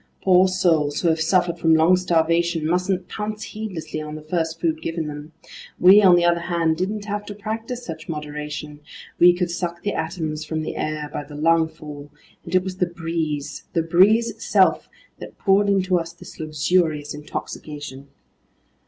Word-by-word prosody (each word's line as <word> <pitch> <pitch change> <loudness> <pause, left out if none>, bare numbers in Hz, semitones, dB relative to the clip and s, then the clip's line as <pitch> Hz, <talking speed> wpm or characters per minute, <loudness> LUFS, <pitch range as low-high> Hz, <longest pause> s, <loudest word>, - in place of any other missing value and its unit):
Poor 185 0 +5
souls 165 -6 +1
who 170 - +2
have 160 0 +1
suffered 175 0 +1
from 165 -1 +4
long 160 +3 +5
starvation 170 -2 +1
mustn't 180 +2 0
pounce 215 0 -5
heedlessly 180 -8 -6
on 150 0 -6
the 155 - -9
first 165 0 -2
food 160 -2 -1
given 165 0 -3
them. 150 +1 -7 0.5
We, 190 +3 +8
on 185 -3 +7
the 175 0 +3
other 170 0 +3
hand, 170 -2 0
didn't 205 +3 -3
have 205 0 -3
to 205 - -6
practice 225 +4 -5
such 160 -1 -8
moderation: 150 -1 -6 0.4
we 175 +1 +8
could 175 0 -2
suck 175 -1 -4
the 205 - -1
atoms 160 -1 -3
from 155 0 -3
the - - -5
air 155 -1 -3
by - - -3
the 145 +1 -11
lungful, 155 -2 -1 0.3
and - - -4
it 185 - +4
was 185 -1 -6
the 180 - +1
breeze, 165 -4 -4
the 165 -2 +1
breeze 195 +8 +4
itself, - - +1 0.3
that - - -10
poured 200 0 +3
into 190 -2 +2
us 165 0 -6
this 175 - -13
luxurious 155 0 0
intoxication! 145 -1 -7
165 Hz, 170 wpm, -22 LUFS, 155-185 Hz, 0.5 s, We